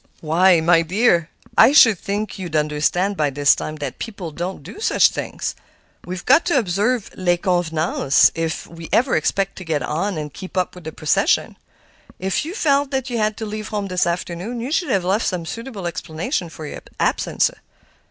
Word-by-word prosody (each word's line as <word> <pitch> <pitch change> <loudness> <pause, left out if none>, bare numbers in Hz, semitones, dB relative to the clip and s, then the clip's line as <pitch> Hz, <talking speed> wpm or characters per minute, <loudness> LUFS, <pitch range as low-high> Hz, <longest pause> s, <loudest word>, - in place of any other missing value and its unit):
"Why, 170 +2 +4
my 165 +1 +4
dear, 170 -2 +2 0.3
I 275 - +7
should 225 - +7
think 205 +1 -4
you'd 175 -4 -5
understand 155 +6 +1
by 150 -4 +1
this 140 +1 +4
time 155 - -5
that 145 -2 -6
people 195 -7 -6
don't 175 +5 -5
do - - -10
such 445 - +4
things; - - -4 0.5
we've 180 0 -6
got 275 +6 +5
to 345 -5 +2
observe 215 +2 0
les 175 -1 +1
convenances 165 -5 +2
if 165 -1 -3
we 165 -1 -10
ever 255 +3 +3
expect 195 +5 0
to 190 - -7
get 155 -5 -1
on 170 +8 -2
and 150 -2 -5
keep 185 0 -9
up 185 - 0
with 180 -3 -13
the 160 - -4
procession. 155 -1 +1 0.6
If 190 +6 -1
you 340 +5 -6
felt 285 - +2
that 265 -2 -2
you 235 - -1
had 215 0 0
to 220 - -4
leave 215 0 -5
home 205 -2 -3
this 180 -1 +1
afternoon, 180 +6 -3
you 245 +4 -4
should 345 +2 0
have 190 -3 +1
left 195 +5 +1
some 180 -3 -2
suitable 230 0 -6
explanation 170 - -3
for 160 -1 -9
your - - -7 0.2
absence. - - +1
185 Hz, 190 wpm, -21 LUFS, 165-215 Hz, 0.6 s, I